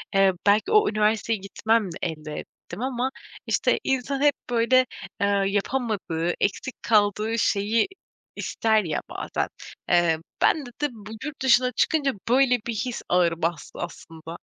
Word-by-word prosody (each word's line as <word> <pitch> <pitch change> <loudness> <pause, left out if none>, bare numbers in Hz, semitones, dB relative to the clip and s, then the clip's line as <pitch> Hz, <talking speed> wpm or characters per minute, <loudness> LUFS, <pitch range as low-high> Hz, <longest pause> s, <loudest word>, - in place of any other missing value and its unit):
eee 195 -1 +5
,belki 215 - +4
o 425 0 +5
üniversiteye 215 +1 +1
gitmemle 200 0 0
elde 155 -2 -4
ettim 225 - -9
ama, 255 0 -1 0.4
işte, - - +2
insan 270 +1 -1
hep, 290 -1 +5 0.2
böyle, 245 +2 +4 0.3
aaa, 200 -1 +2
yapamadığı, 200 -5 -1
eksik 225 +6 -2
kaldığı 215 +1 +2
şeyi 210 - +2 0.5
ister 220 -2 +1
ya 155 -3 -2
bazen. - - -3 0.4
Eee, 175 -2 +4 0.2
bende 290 -6 +2
de, 295 - +3
bu, 215 -2 -11
yurt 300 -3 -6
dışına 255 -1 +4
çıkınca 280 +3 +1 0.2
böyle 250 -1 +4
bir 235 - -1
his 240 +3 -3
ağır 170 -2 +2
bastı 165 -2 -3
aslında. 165 -1 -8
220 Hz, 135 wpm, -25 LUFS, 190-255 Hz, 0.5 s, eee